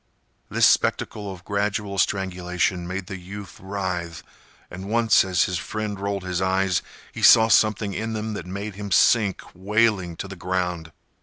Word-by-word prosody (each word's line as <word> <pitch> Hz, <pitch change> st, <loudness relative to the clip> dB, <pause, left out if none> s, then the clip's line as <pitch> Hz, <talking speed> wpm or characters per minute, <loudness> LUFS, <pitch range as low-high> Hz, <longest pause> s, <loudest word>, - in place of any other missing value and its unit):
This -, -, +3 dB
spectacle 105 Hz, -2 st, +1 dB
of 90 Hz, -2 st, -11 dB
gradual 100 Hz, -1 st, -2 dB
strangulation 90 Hz, -2 st, -1 dB
made 90 Hz, +1 st, -4 dB
the 95 Hz, -1 st, -7 dB
youth 100 Hz, +1 st, -10 dB
writhe, 90 Hz, -4 st, -4 dB, 0.5 s
and 95 Hz, +3 st, -7 dB
once 115 Hz, -1 st, +4 dB
as 90 Hz, -2 st, +2 dB
his 90 Hz, -2 st, -2 dB
friend 105 Hz, -2 st, -4 dB
rolled 100 Hz, -1 st, -3 dB
his 90 Hz, -1 st, -2 dB
eyes, 95 Hz, -1 st, +1 dB, 0.3 s
he -, -, -8 dB
saw 110 Hz, 0 st, +7 dB
something 105 Hz, -2 st, +3 dB
in 110 Hz, +4 st, -3 dB
them 110 Hz, 0 st, -3 dB
that 100 Hz, -, -6 dB
made 100 Hz, +3 st, -5 dB
him 100 Hz, +1 st, -7 dB
sink 100 Hz, 0 st, +3 dB
wailing 100 Hz, -2 st, +1 dB
to 95 Hz, -, -6 dB
the 95 Hz, -, -8 dB
ground. 90 Hz, -2 st, -3 dB
95 Hz, 160 wpm, -23 LUFS, 90-105 Hz, 0.5 s, saw